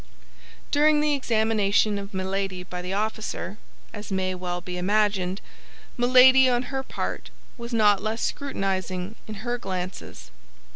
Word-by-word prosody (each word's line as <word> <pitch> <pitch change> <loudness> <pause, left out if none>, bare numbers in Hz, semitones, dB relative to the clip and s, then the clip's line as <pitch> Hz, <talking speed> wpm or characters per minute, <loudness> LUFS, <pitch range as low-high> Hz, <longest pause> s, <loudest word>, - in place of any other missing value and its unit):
During 300 +1 +4
the 300 0 +2
examination 220 -5 +1
of 200 0 -8
Milady 190 -1 -3
by 180 0 -6
the 180 +1 -5
officer, 215 0 -3 0.3
as 210 -1 -8
may 185 -1 0
well 180 -1 -4
be 180 +1 -7
imagined, 200 -1 +1 0.5
Milady 255 +1 +6
on 245 0 +1
her 265 - 0
part 265 - -5 0.3
was 235 0 -8
not 210 -4 +4
less 220 +2 -2
scrutinizing 190 -7 -2
in 215 - -6
her 240 0 -1
glances. 180 - -6
205 Hz, 135 wpm, -25 LUFS, 185-240 Hz, 0.5 s, Milady